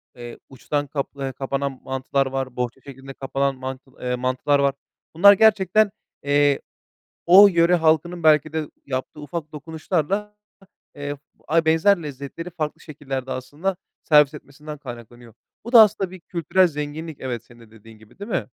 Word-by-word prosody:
eee, 120 -1 -10
uçtan 145 +2 -3
kaplayan 140 -1 -4
kapanan 135 0 -3
mantılar 135 +1 -1
var, 135 -1 -4
bohça 125 +1 -4
şeklinde 135 0 -11
kapanan 135 0 -2
mantıl 130 0 -9
eee, 125 0 -1
mantılar 130 +3 0
var. 140 -1 +2 0.4
Bunlar 200 +5 +8
gerçekten, 210 0 +3 0.3
eee, 145 0 +2 0.7
o 195 +4 +9
yöre 170 -1 +3
halkının 165 +1 +1
belki 155 -1 +4
de 155 -2 -3 0.2
yaptığı 130 +2 -5
ufak 155 +1 -6
dokunuşlarla, 165 +6 -3 0.6
eee, 145 0 -5 0.3
ay 165 +1 +2
benzer 165 +4 +3
lezzetleri 145 +4 -7
farklı 160 -2 -4
şekillerde 135 -4 -6
aslında 150 +10 -3 0.3
servis 150 -1 +4
etmesinden 150 +1 -10
kaynaklanıyor. 120 -3 -11 0.3
Bu 235 - -8
da 235 - +10
aslında 200 -3 +1
bir 185 -1 -11
kültürel 180 +2 +1
zenginlik, 150 0 -6
evet, 120 -3 -5
senin 120 0 -19
de 115 -2 -17
dediğin 110 0 -16
gibi, 110 0 -21
değil 200 +3 -8
mi? 175 - -1
145 Hz, 150 wpm, -22 LUFS, 135-170 Hz, 0.7 s, da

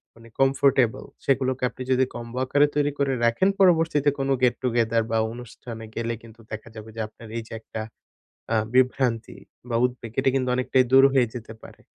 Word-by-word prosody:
মানে 115 0 -16
কমফোর্টেবল, 135 -3 +3 0.2
সেগুলোকে 130 -1 +1
আপনি 130 - -8
যদি 130 0 +4
কম্বো 120 +1 -7
আকারে 145 +3 +4
তৈরি 145 0 +2
করে 140 -1 +1
রাখেন, 115 +12 +3
পরবর্তীতে 165 -5 +4
কোনো 135 0 0
গেট-টুগেদার 120 -2 +2
বা 115 - +2 0.2
অনুষ্ঠানে 115 -1 -9
গেলে 115 0 -2
কিন্তু 115 0 -15
দেখা 110 +1 -7
যাবে 110 0 -9
যে, - - -7
আপনার 115 +1 -14
এই 115 - -4
যে - - -10
একটা 110 - -6 0.7
আ - - +3 0.2
বিভ্রান্তি 125 -3 +1 0.3
বা 115 - 0
উদ্বেগ, 120 -3 -3
এটা 135 - +3
কিন্তু 130 -1 0
অনেকটাই 130 0 +2
দূর 135 0 +8
হয়ে 130 -3 +4
যেতে 115 -2 -7
পারে। - - -14
125 Hz, 175 wpm, -24 LUFS, 115-135 Hz, 0.7 s, দূর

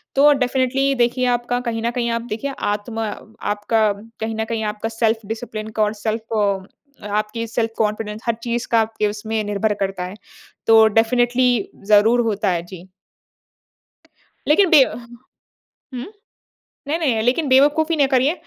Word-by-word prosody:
तो 290 +2 +6
डेफिनिटली 265 +1 +1
देखिए 245 +1 +1
आपका 245 +1 -2
कहीं 225 -1 -3
न 235 - 0
कहीं 240 -1 -1
आप 230 0 -1
देखिए 275 +6 -3
आत्मा 215 +2 -2
अ, 220 - -12 0.2
आपका 210 +1 +1 0.3
कहीं 220 0 -3
न 220 0 -2
कहीं 225 0 -3
आपका 215 +1 -4
सेल्फ 225 -1 0
डिसिप्लिन 220 0 -5
का - - +5
और 210 0 0
सेल्फ़ 225 +1 -3
अ 195 -2 0 0.5
आपकी 215 +2 -2
सेल्फ 225 0 -1
कॉन्फिडेंस 210 0 -2
हर 235 - +1
चीज़ 240 0 -2
का 230 - +5
आपके 220 -1 -1
उसमें 215 +1 -3
निर्भर 210 +1 0
करता 195 -2 -2
है। 185 +2 -8 0.5
तो 225 0 +7
डेफिनिटली 240 +1 +2 0.2
ज़रूर 215 +3 +5
होता 210 -3 0
है, 170 -1 -1
जी। 185 0 -12 1.6
लेकिन 355 +5 +4
बे 305 -5 +8
अ, - - -4
ह 235 -1 -11 0.9
हुँ? 245 - -5 0.8
नहीं-नहीं 290 -8 0
लेकिन 260 +6 +1
बेवकूफ़ी 295 +5 +4
न 280 -2 +4
करिए। 265 +4 +3
225 Hz, 160 wpm, -20 LUFS, 215-250 Hz, 1.6 s, बे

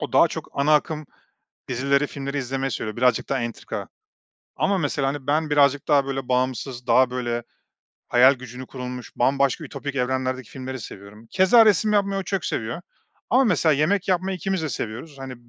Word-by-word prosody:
O - - -5
daha - - +6
çok - - -6
ana 145 +2 +3
akım 155 0 0 0.6
dizileri, 140 +3 +1
filmleri 140 0 -5
izlemeyi 135 0 -2
seviyor 110 -2 -4
birazcık 125 0 +2
daha 135 - 0
entrika. 115 -1 -5 0.7
Ama 195 0 +1
mesela, 145 -4 0
hani, 135 -1 -4
ben 150 +2 +1
birazcık 145 -1 +3
daha 140 -3 +4
böyle 135 -2 -4
bağımsız 125 0 -1
daha 125 +1 +4
böyle 120 -1 -2 0.7
hayal 130 +3 +6
gücünü 130 0 -9
kurulmuş 125 -1 -7
bambaşka 140 +5 +1
ütopik 140 0 -6
evrenlerdeki 130 -1 -1
filmleri 130 -1 -6
seviyorum. 105 +2 -11
Keza 190 +5 +6
resim 210 +1 +3
yapmayı 200 -1 +1
o - - -3
çok 195 -1 -3
seviyor. 120 +9 -3 0.5
Ama 255 +4 +5
mesela 175 -7 +3
yemek 170 +8 +1
yapmayı 185 +1 0
2'miz 190 -1 -2
de 155 - -2
seviyoruz. 120 +4 -6
Hani, 135 -1 -7
135 Hz, 170 wpm, -23 LUFS, 125-155 Hz, 0.7 s, daha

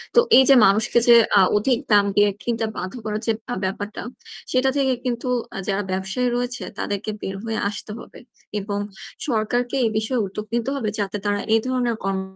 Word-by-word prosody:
তো - - +8 0.2
এই 265 - +8
যে 270 - +8
মানুষকে 215 +4 +3
যে 235 - +9 0.2
আ - - +7 0.2
অধিক 240 +3 +1
দাম 205 -1 +6
দিয়ে 205 0 +5
কিনতে 230 -2 -1
বাধ্য 185 +1 -4
করার 215 0 -2
যে - - +4 0.2
আ - - -1
ব্যাপারটা 205 +2 -4 0.5
সেটা 260 +1 +3
থেকে 265 -2 +2
কিন্তু 245 0 -2 0.3
আ - - -5
যারা 200 +1 0
ব্যবসায়ী 190 +7 -1
রয়েছে 245 0 -2 0.2
তাদেরকে 205 +1 -3
বের 195 - -4
হয়ে 225 -1 -2
আসতে 210 +1 -7
হবে - - -12 0.4
এবং 200 0 -3 0.5
সরকারকে 245 +2 0
এ - - +4
বিষয়ে 220 +1 0
উদ্যোগ 210 +2 -6
নিতে 240 +2 -1
হবে 230 -6 -2
যাতে 200 +1 -2
তারা 205 0 +1 0.2
এ - - +6
ধরনের 245 -3 0
কর্ম 195 0 -1
220 Hz, 190 wpm, -22 LUFS, 205-245 Hz, 0.5 s, যে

